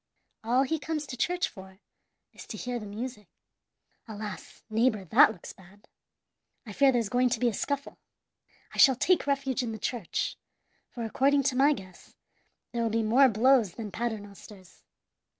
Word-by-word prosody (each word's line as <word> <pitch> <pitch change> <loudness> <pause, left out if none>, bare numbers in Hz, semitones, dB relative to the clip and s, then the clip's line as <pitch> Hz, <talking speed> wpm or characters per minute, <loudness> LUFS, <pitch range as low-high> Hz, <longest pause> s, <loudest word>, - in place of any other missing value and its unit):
All 245 +4 +2
he 315 +4 -2
comes 305 0 -3
to 265 - -7
church 355 +8 0
for 190 0 -13 0.6
is - - -12
to - - -7
hear 245 -1 -4
the 210 - -8
music. 210 0 -7 0.8
"Alas! 210 -2 -8
neighbor, 220 -2 +1
that 255 - +6
looks 175 - -11
bad. 195 +3 -20 0.8
I 210 - -8
fear 275 +4 +4
there's 235 -4 0
going 250 +4 +2
to 235 -1 -1
be 245 - +2
a - - -5
scuffle. 280 +6 -4 0.7
I - - -7
shall 265 -2 +7
take 345 +4 +1
refuge 275 -2 0
in 235 -3 -4
the - - -5
church, 220 -3 -3 0.5
for, 235 - -7
according 275 +5 +2
to 270 -1 0
my 280 +3 +4
guess, 185 -8 -12 0.6
there 235 - -2
will 230 - +1
be 225 +1 0
more 255 +5 +5
blows 230 -3 +3
than 215 -3 -7
Paternosters. 205 -4 -7
235 Hz, 170 wpm, -28 LUFS, 210-270 Hz, 0.8 s, shall